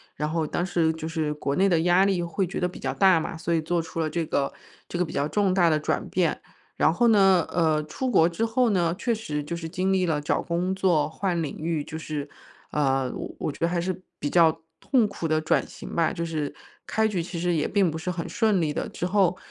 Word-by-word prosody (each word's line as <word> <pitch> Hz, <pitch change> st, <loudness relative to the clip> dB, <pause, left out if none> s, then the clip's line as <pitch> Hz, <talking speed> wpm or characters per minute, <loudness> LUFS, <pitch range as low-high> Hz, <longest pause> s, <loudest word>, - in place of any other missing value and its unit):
然 150 Hz, +1 st, -2 dB
后 160 Hz, -1 st, -1 dB
当 175 Hz, -, -1 dB
时 165 Hz, -3 st, +1 dB
就 160 Hz, 0 st, -5 dB
是 160 Hz, -2 st, -1 dB
国 145 Hz, -2 st, -2 dB
内 195 Hz, +1 st, +4 dB
的 170 Hz, -3 st, +3 dB
压 180 Hz, +3 st, +4 dB
力 185 Hz, -3 st, +1 dB
会 170 Hz, +2 st, -1 dB
觉 -, -, -6 dB
得 180 Hz, -, +1 dB
比 180 Hz, -, -11 dB
较 -, -, -2 dB
大 190 Hz, -4 st, +5 dB
嘛， 160 Hz, -, -4 dB
所 170 Hz, +1 st, -2 dB
以 165 Hz, -, +2 dB
做 170 Hz, +1 st, 0 dB
出 165 Hz, 0 st, -7 dB
了 160 Hz, -, 0 dB
这 165 Hz, +1 st, -2 dB
个 140 Hz, -2 st, -1 dB, 0.3 s
这 175 Hz, -, -4 dB
个 180 Hz, -, +2 dB
比 165 Hz, -, -6 dB
较 140 Hz, +1 st, 0 dB
重 195 Hz, +2 st, +1 dB
大 175 Hz, -3 st, +4 dB
的 155 Hz, -, +3 dB
转 150 Hz, -, -2 dB
变。 -, -, +1 dB, 0.4 s
然 160 Hz, -, +3 dB
后 235 Hz, +6 st, +3 dB
呢， 195 Hz, -5 st, +5 dB
呃， 160 Hz, -3 st, +2 dB
出 255 Hz, -, -3 dB
国 170 Hz, -8 st, +4 dB
之 220 Hz, +7 st, -1 dB
后 235 Hz, +2 st, +2 dB
呢， 175 Hz, -4 st, +1 dB
确 235 Hz, +2 st, 0 dB
实 150 Hz, -10 st, -3 dB
就 170 Hz, +3 st, -4 dB
是 165 Hz, -1 st, -5 dB
经 185 Hz, +3 st, -1 dB
历 185 Hz, -1 st, +2 dB
了 155 Hz, -3 st, 0 dB
找 145 Hz, -, 0 dB
工 180 Hz, +2 st, -1 dB
作、 180 Hz, -6 st, +2 dB
换 175 Hz, +1 st, -1 dB
领 150 Hz, -, -4 dB
域， 160 Hz, -1 st, -2 dB
就 160 Hz, -, -7 dB
是， 150 Hz, -2 st, -5 dB, 0.4 s
呃， 135 Hz, -3 st, +1 dB
我 -, -, -6 dB
我 -, -, -2 dB
觉 -, -, -13 dB
得 170 Hz, -, +2 dB
还 175 Hz, 0 st, -1 dB
是 185 Hz, +1 st, -3 dB, 0.2 s
比 145 Hz, -, -2 dB
较 165 Hz, -2 st, +4 dB, 0.2 s
痛 250 Hz, -6 st, +3 dB
苦 200 Hz, -4 st, -6 dB
的 155 Hz, -1 st, +2 dB
转 155 Hz, -, +1 dB
型 -, -, -9 dB
吧， 165 Hz, -1 st, +2 dB
就 170 Hz, -, -3 dB
是 155 Hz, -3 st, -3 dB, 0.3 s
开 220 Hz, 0 st, +1 dB
局 185 Hz, -6 st, -2 dB
其 170 Hz, -1 st, -6 dB
实 175 Hz, +1 st, +1 dB
也 155 Hz, -3 st, +1 dB
并 195 Hz, -3 st, +2 dB
不 160 Hz, -, -4 dB
是 180 Hz, +3 st, -3 dB
很 170 Hz, -1 st, -4 dB
顺 215 Hz, -6 st, +2 dB
利 150 Hz, -2 st, 0 dB
的。 -, -, -3 dB
之 175 Hz, -, -4 dB
后 185 Hz, -1 st, +2 dB
170 Hz, 275 characters per minute, -25 LUFS, 155-185 Hz, 0.4 s, 大